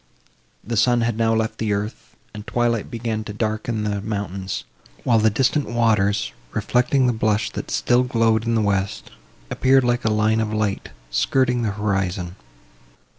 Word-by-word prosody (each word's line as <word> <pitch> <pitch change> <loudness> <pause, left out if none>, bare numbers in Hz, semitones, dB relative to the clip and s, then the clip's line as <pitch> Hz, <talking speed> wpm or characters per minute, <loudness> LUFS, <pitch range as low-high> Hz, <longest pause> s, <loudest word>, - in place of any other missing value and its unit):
The 115 +2 -3
sun 120 +2 +3
had 115 -1 0
now 115 0 +2
left 110 0 -1
the 110 -2 0
earth, 100 +2 -5 0.2
and 105 0 -9
twilight 120 -2 0
began 115 -2 -3
to 105 - -6
darken 110 +1 -2
the 100 -1 -2
mountains; 100 -3 -4 0.4
while 115 -3 +3
the 110 +1 +4
distant 135 +6 +1
waters, 105 - +1 0.2
reflecting 130 +2 +2
the 125 - +2
blush 110 -1 0
that - - -6
still 125 +1 +2
glowed 115 -3 +2
in 115 0 0
the 110 - +2
west, 100 -1 -1 0.4
appeared 135 0 +4
like 120 0 +1
a 110 - +2
line 110 +1 +2
of 110 -1 -1
light, 105 -2 -1 0.2
skirting 125 - +1
the 110 -3 -1
horizon. 95 -3 -2
110 Hz, 165 wpm, -22 LUFS, 105-120 Hz, 0.4 s, the